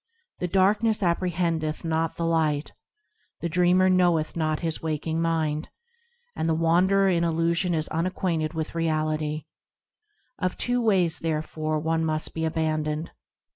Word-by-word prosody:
The 180 - -1
darkness 205 +4 +2
apprehendeth 170 -3 -1
not 165 0 0
the 170 - -2
Light; 155 -3 0 0.7
The 170 - -2
dreamer 180 +2 +3
knoweth 175 -4 +2
not 155 -2 -1
his 165 -2 -2
waking 160 +1 -2
mind; 160 -2 -1 0.7
And 165 - -1
the 160 - +2
wanderer 180 +4 +3
in 170 -3 +2
illusion 170 +1 +1
is 155 -1 -1
unacquainted 165 -1 -1
with 160 -1 -3
Reality; 155 -2 -1 0.9
Of 185 -1 -1
two 245 0 0
ways, 185 -7 +3
therefore, 155 -1 -2
one 160 +1 0
must 155 -1 -1
be 160 0 -2
abandoned. 155 -1 -1
165 Hz, 135 wpm, -25 LUFS, 155-175 Hz, 0.9 s, dreamer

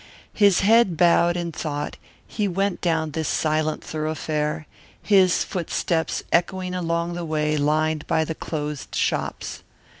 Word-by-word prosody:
His 200 -3 +4
head 210 -3 +4
bowed 175 0 +4
in 170 -1 -3
thought 150 -2 -4 0.3
he 210 -2 -2
went 195 +1 -1
down 160 -3 0
this 160 +1 -2
silent 155 0 0
thoroughfare, 155 0 -2 0.3
his 190 -4 +4
footsteps 170 -2 -2
echoing 180 +1 0
along 170 -1 -1
the 175 0 -4
way 155 -1 0
lined 155 +1 0
by 160 -1 +2
the 160 - -3
closed 150 -2 -5
shops. - - -2
165 Hz, 130 wpm, -23 LUFS, 155-180 Hz, 0.3 s, His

